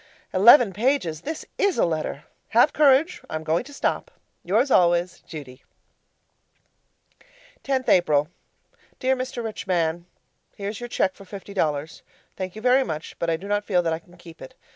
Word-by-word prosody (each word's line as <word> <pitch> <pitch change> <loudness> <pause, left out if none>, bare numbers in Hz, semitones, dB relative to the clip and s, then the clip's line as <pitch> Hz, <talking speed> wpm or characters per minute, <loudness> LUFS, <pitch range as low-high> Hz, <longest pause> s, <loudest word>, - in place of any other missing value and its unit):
Eleven 215 +2 +7
pages 210 - 0
this 315 - -5
is 400 -2 +2
a - - +3
letter! 155 -3 -3 0.3
Have 240 +7 +4
courage. 290 +3 +3
I'm 155 0 -4
going 160 +2 0
to 285 - -12
stop. 280 - -2 0.3
Yours 225 +10 +1
always, 175 0 +2
Judy 140 -5 -10 2.0
10th 265 -2 -1
April 150 -5 +3 0.7
Dear 260 +1 +1
Mr. 255 -1 -5
Rich 220 -3 -6
Man, 170 -1 0 0.5
Here's 205 +1 -5
your 240 0 -7
cheque 190 -5 0
for 195 - -14
fifty 200 +1 -10
dollars. 155 -4 -2 0.3
Thank 185 0 -5
you 215 - -9
very 255 +2 +4
much, 155 -9 -6
but 170 - -1
I 165 - +1
do 190 +5 -10
not 205 0 0
feel 180 -4 +1
that 165 -1 0
I 160 - -3
can 175 +1 -21
keep 170 -2 -14
it. 130 - -11
190 Hz, 165 wpm, -24 LUFS, 165-245 Hz, 2.0 s, Eleven